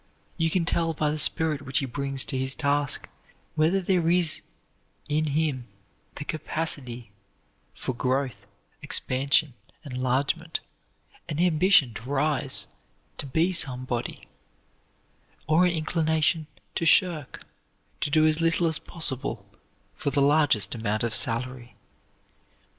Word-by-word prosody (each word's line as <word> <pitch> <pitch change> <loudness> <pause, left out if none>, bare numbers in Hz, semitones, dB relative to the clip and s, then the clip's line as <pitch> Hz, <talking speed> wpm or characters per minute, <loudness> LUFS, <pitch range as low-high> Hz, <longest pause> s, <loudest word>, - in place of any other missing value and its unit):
You 165 -1 +1
can 170 0 0
tell 165 -1 0
by 150 -1 +1
the 155 - -3
spirit 155 -2 +1
which 130 -1 -1
he 135 - +1
brings 135 +1 -2
to 135 - -5
his 130 +1 0
task 145 -2 -1 0.5
whether 160 +5 +2
there 180 -3 +1
is 175 -2 +2 0.7
in 155 +1 +1
him 145 -4 -1 0.5
the 145 - -6
capacity 140 -8 -3 0.6
for 130 - -3
growth, 125 -5 -2 0.3
expansion, 140 0 +2 0.3
enlargement; 135 +4 -1 0.7
an 150 - -3
ambition 170 - +4
to 115 +5 -9
rise, 135 -7 0 0.5
to 140 - -2
be 165 +7 +1
somebody, 130 -6 -1 1.2
or 160 +3 +4
an - - +1
inclination 160 -1 0 0.3
to - - -2
shirk, 165 -6 +2 0.5
to - - -1
do 155 +2 +4
as 155 +1 +3
little 165 +1 +3
as 160 -1 +3
possible 140 -6 -3 0.5
for - - -2
the 140 - 0
largest 140 -6 +3
amount 110 -2 0
of 115 -1 -1
salary. 125 +1 -1
145 Hz, 125 wpm, -26 LUFS, 130-160 Hz, 1.2 s, ambition